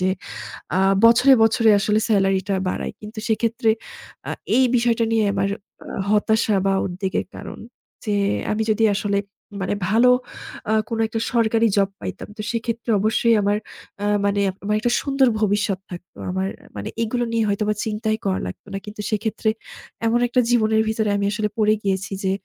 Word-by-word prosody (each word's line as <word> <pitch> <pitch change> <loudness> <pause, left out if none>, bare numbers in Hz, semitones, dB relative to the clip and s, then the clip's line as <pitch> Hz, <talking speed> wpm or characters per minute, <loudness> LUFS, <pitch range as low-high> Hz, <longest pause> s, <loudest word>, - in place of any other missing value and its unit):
যে, 185 - +2 0.7
আ - - +3 0.3
বছরে, 250 +4 +7
বছরে 225 0 +4
আসলে 210 +2 +2
সেলারি 195 -2 +3
টা 195 - +2
বাড়াই। - - -3
কিন্তু 215 +1 -8
সেক্ষেত্রে 230 +1 +1 0.6
আ - - -1 0.3
এই 260 - +5
বিষয়টা 235 -1 +2
নিয়ে 225 -1 +3
আমার 195 0 0 0.4
আ - - -10 0.2
হতাশা 215 +1 +2
বা 195 - +3
উদ্বেগের 190 +1 -3
কারন। - - -8 0.5
যে 210 -2 0 0.4
আমি 215 +1 0
যদি 215 +1 +1
আসলে 200 0 0 0.4
মানে 190 - -1 0.2
ভালো 230 +4 +5 0.6
আ - - +3 0.2
কোনো 225 -1 -1
একটা 225 +1 -3
সরকারি 230 -1 +3
জব 195 -1 +3
পাইতাম। - - -6
তো - - -4
সেক্ষেত্রে 230 0 -3
অবশ্যই 225 +2 +3
আমার 205 +1 +1 0.5
আ - - 0 0.2
মানে 200 0 +1 0.2
আমার 210 +1 0
একটা 240 +2 0
সুন্দর 275 -2 +2
ভবিষ্যৎ 205 -2 +1
থাকতো। 175 0 -10
আমার 190 +1 -1 0.3
মানে 100 - -4
এগুলো 240 +2 -1
নিয়ে 225 -1 +2
হয়তো 205 +1 0
আমার 210 -1 0
চিন্তাই 220 0 -1
করা 190 -1 +1
লাগতো 90 - -9
না। - - -2
কিন্তু 210 0 -7
সেক্ষেত্রে 220 +1 0 0.6
এমন 235 +1 +2
একটা 240 +1 +1
জীবনের 220 -2 +3
ভিতরে 220 -1 0
আমি 200 - 0
আসলে 210 0 -1
পড়ে 215 -1 +4
গিয়েছি 195 0 -1
যে, 190 - +1
215 Hz, 170 wpm, -22 LUFS, 200-230 Hz, 0.7 s, বছরে